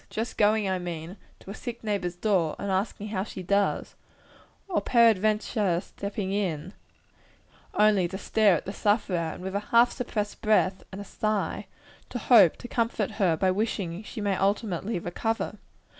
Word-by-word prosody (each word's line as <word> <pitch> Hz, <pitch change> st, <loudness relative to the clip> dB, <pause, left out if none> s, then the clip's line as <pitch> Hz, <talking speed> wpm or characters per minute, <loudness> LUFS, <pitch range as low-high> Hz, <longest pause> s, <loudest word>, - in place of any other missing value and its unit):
just 225 Hz, +2 st, -4 dB
going, 210 Hz, -1 st, +3 dB
I 190 Hz, -1 st, 0 dB
mean, 170 Hz, 0 st, -6 dB, 0.3 s
to 195 Hz, -, -9 dB
a -, -, -5 dB
sick 235 Hz, +2 st, -7 dB
neighbor's 200 Hz, -5 st, -2 dB
door, 175 Hz, -5 st, +1 dB
and 200 Hz, -, -3 dB
asking 200 Hz, +2 st, -2 dB
how 190 Hz, -3 st, -1 dB
she 190 Hz, -2 st, -8 dB
does 200 Hz, +2 st, 0 dB, 0.7 s
or 365 Hz, -4 st, 0 dB
peradventure 215 Hz, -4 st, +3 dB
stepping 200 Hz, 0 st, -5 dB
in, 185 Hz, -3 st, -2 dB, 1.0 s
only 210 Hz, -4 st, +4 dB
to 190 Hz, +2 st, -6 dB
stare 210 Hz, -2 st, +3 dB
at -, -, -4 dB
the 195 Hz, -, -5 dB
sufferer, 205 Hz, -3 st, +1 dB, 0.2 s
and 180 Hz, -, -10 dB
with 190 Hz, 0 st, -4 dB
a 200 Hz, -, +1 dB
half 235 Hz, +1 st, +5 dB
suppressed 210 Hz, -4 st, -4 dB
breath 200 Hz, -3 st, +2 dB
and 195 Hz, -, -7 dB
a -, -, -5 dB
sigh, 205 Hz, -2 st, -2 dB, 0.4 s
to -, -, -4 dB
hope 220 Hz, -7 st, +6 dB
to -, -, -9 dB
comfort 230 Hz, -3 st, -1 dB
her 170 Hz, -4 st, +3 dB
by 185 Hz, +2 st, +2 dB
wishing 195 Hz, -3 st, -2 dB
she 220 Hz, +1 st, -7 dB
may 200 Hz, -1 st, +1 dB
ultimately 195 Hz, 0 st, -1 dB
recover? 225 Hz, +6 st, -3 dB
200 Hz, 165 wpm, -27 LUFS, 185-215 Hz, 1.0 s, hope